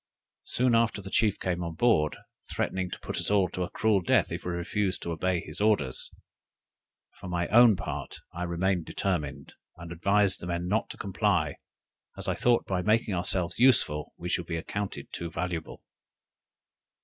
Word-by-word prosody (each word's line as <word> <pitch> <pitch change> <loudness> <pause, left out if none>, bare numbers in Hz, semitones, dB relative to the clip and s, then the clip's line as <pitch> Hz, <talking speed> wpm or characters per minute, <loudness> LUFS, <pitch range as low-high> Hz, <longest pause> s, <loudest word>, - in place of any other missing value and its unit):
Soon 125 -1 +2
after 115 -2 +2
the 95 -1 -8
chief 105 -3 +2
came 90 -1 -2
on 85 -1 -5
board, 80 -8 +2 0.3
threatening 95 -1 -1
to - - -7
put - - -5
us - - -1
all 100 -2 +3
to 90 - -5
a 90 - -1
cruel 110 -3 +2
death 85 - +2
if - - -4
we 90 - -3
refused 90 +3 -1
to 85 - -3
obey 90 +1 0
his - - -7
orders. 100 - +1 1.1
For - - -8
my 85 -1 -1
own 120 -1 +7
part - - -5 0.2
I 85 - -6
remained 90 0 0
determined, 75 -7 -3 0.2
and 85 0 -9
advised 100 +3 +2
the 85 - -7
men 85 0 -2
not 105 +4 0
to - - -7
comply, 95 -2 0 0.6
as - - -2
I - - +2
thought 120 -1 +2
by 95 -2 -1
making 110 +2 +2
ourselves 90 0 0
useful 110 - +3
we 90 - -6
should 90 -1 -1
be 85 - -2
accounted 100 +4 -5
too 85 - -4
valuable. 85 -1 -4
90 Hz, 175 wpm, -28 LUFS, 85-105 Hz, 1.1 s, own